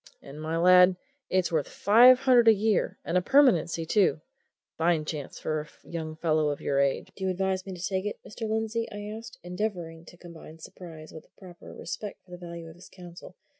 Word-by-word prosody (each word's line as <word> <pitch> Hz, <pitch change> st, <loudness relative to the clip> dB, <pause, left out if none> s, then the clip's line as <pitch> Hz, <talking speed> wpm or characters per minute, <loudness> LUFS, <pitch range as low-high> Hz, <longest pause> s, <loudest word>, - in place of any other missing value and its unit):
And, 140 Hz, +2 st, -10 dB
my 160 Hz, +1 st, -3 dB
lad, 180 Hz, +1 st, +6 dB, 0.3 s
it's 185 Hz, -1 st, 0 dB
worth 155 Hz, -3 st, 0 dB
five 245 Hz, +5 st, +6 dB
hundred 250 Hz, -3 st, +4 dB
a 225 Hz, -, +9 dB
year 215 Hz, 0 st, 0 dB
and 180 Hz, -, +1 dB
a -, -, -5 dB
permanency, 180 Hz, -, +3 dB
too! 190 Hz, -1 st, +2 dB
A -, -, -46 dB
fine 165 Hz, -2 st, +1 dB
chance 150 Hz, -3 st, -6 dB
for 155 Hz, -1 st, -2 dB
a 150 Hz, -, -13 dB, 0.2 s
young 160 Hz, -2 st, -6 dB
fellow 155 Hz, -2 st, +1 dB
of 145 Hz, -, -3 dB
your 140 Hz, -1 st, -1 dB
age!" 140 Hz, -1 st, 0 dB
"Do 190 Hz, -, -5 dB
you -, -, 0 dB
advise 190 Hz, 0 st, -2 dB
me 190 Hz, -, -6 dB
to 180 Hz, +1 st, -4 dB
take 190 Hz, +1 st, -2 dB
it, 210 Hz, -, -5 dB
Mr. 220 Hz, +1 st, -6 dB
Lindsey?" 220 Hz, +1 st, -2 dB
I 205 Hz, +1 st, -7 dB
asked, 225 Hz, +1 st, -10 dB
endeavouring 175 Hz, -3 st, -5 dB
to 175 Hz, -, -15 dB
combine 165 Hz, -2 st, -13 dB
surprise 160 Hz, -1 st, -12 dB
with 160 Hz, -, -12 dB
a -, -, -31 dB
proper 180 Hz, -3 st, -13 dB
respect 205 Hz, +4 st, -8 dB
for 180 Hz, -, -20 dB
the 180 Hz, -, -9 dB
value 170 Hz, -1 st, -8 dB
of 160 Hz, +1 st, -13 dB
his 180 Hz, -, -15 dB
counsel. 180 Hz, 0 st, -13 dB
180 Hz, 210 wpm, -27 LUFS, 160-205 Hz, 0.3 s, a